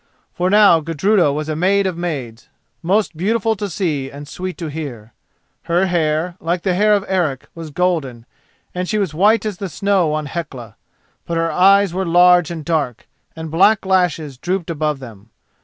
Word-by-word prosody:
For 180 0 0
now 205 -4 +6
Gudruda 165 +2 +1
was 150 +2 -3
a 155 - -2
maid 195 +4 +2
of 185 -2 -1
maids, 140 -10 -5 0.3
most 195 +1 0
beautiful 220 +6 0
to 205 0 -4
see 155 -6 -2
and 145 +1 -10
sweet 185 +4 -6
to 170 - -5
hear. 140 -8 -7 0.5
Her 175 +3 +2
hair, 170 -1 0
like 170 +1 -2
the 185 - +1
hair 210 +3 +3
of 200 -1 -2
Eric, 170 -9 -1
was 165 -2 -8
golden, 145 -8 -2 0.5
and 180 0 -3
she 215 - 0
was 195 -7 -1
white 210 +7 +3
as 210 -4 -3
the 195 0 -5
snow 185 -2 +1
on 155 0 -2
Hecla; 135 - -7 0.5
but 170 - -2
her 165 0 0
eyes 195 0 +4
were 190 +1 -1
large 175 -1 +4
and 165 -3 -6
dark, 150 -8 -2 0.3
and 160 -1 -7
black 200 +6 +3
lashes 170 -8 0
drooped 180 0 -2
above 155 -2 -1
them. 115 -5 -12
170 Hz, 180 wpm, -18 LUFS, 150-190 Hz, 0.5 s, now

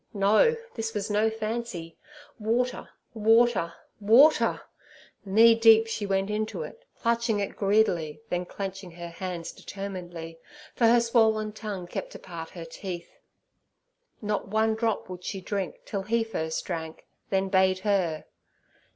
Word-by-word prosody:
No, 210 - +4 0.2
this 225 -1 -4
was 210 +1 -2
no 210 +2 +3
fancy. 220 -6 -4 0.4
Water, 240 +4 -1 0.2
water, 225 -5 +3 0.2
water! 240 +9 +5 0.6
Knee 225 +4 +6
deep 225 -1 +6
she 220 -2 -3
went 195 +1 0
into 215 +1 -2
it, 470 - -11
clutching 230 -2 +1
it 200 - -3
greedily, 195 -7 +1
then 180 0 -2
clenching 195 -1 -6
her 170 0 -7
hands 170 -1 -5
determinedly, 175 -4 -7 0.3
for 235 - +3
her 235 +1 +6
swollen 220 -2 +2
tongue 210 -4 -6
kept 175 - -6
apart 165 -3 -8
her 170 -2 -8
teeth. 175 +1 -8 1.0
Not 210 -1 -1
one 220 +2 +2
drop 225 -1 -1
would 180 -1 -8
she 195 - -4
drink 195 0 -4
till 200 - -3
He 225 +4 +1
first 160 -8 -3
drank, 160 -3 -5 0.2
then 195 0 +1
bade 190 -1 +3
her! 185 -6 0
205 Hz, 135 wpm, -27 LUFS, 180-225 Hz, 1.0 s, Knee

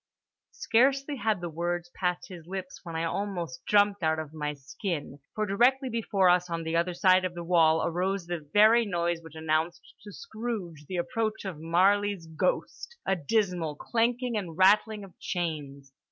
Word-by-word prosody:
Scarcely 275 - +2
had 215 -6 0
the 175 - -4
words 175 +1 -3
passed 180 -2 -2
his 170 -3 -11
lips 185 0 -6
when 165 -3 -7
I 165 - -1
almost 175 -5 -3
jumped 205 -1 +3
out 160 -1 +1
of 155 -1 -6
my 150 -1 -3
skin, 145 +2 -5 0.2
for 215 - 0
directly 255 +6 +2
before 210 -5 +1
us 180 0 +3
on 165 -1 -3
the 160 +1 -2
other 170 +1 +1
side 185 0 +4
of 180 -1 -3
the 170 - -5
wall 165 -2 +4
arose 180 +2 -1
the 175 0 -3
very 210 +10 +5
noise 175 -4 -1
which 160 -1 -13
announced 160 +2 -2
to 205 - -10
Scrooge 200 -10 -6
the 185 - -4
approach 220 +3 -2
of 180 -6 -5
Marley's 195 +2 +2
ghost—a 195 - -2
dismal 180 -2 0
clanking 240 - 0
and 170 -6 -5
rattling 205 +2 +4
of 190 -3 -13
chains. 145 -6 -4
180 Hz, 170 wpm, -28 LUFS, 165-210 Hz, 0.2 s, very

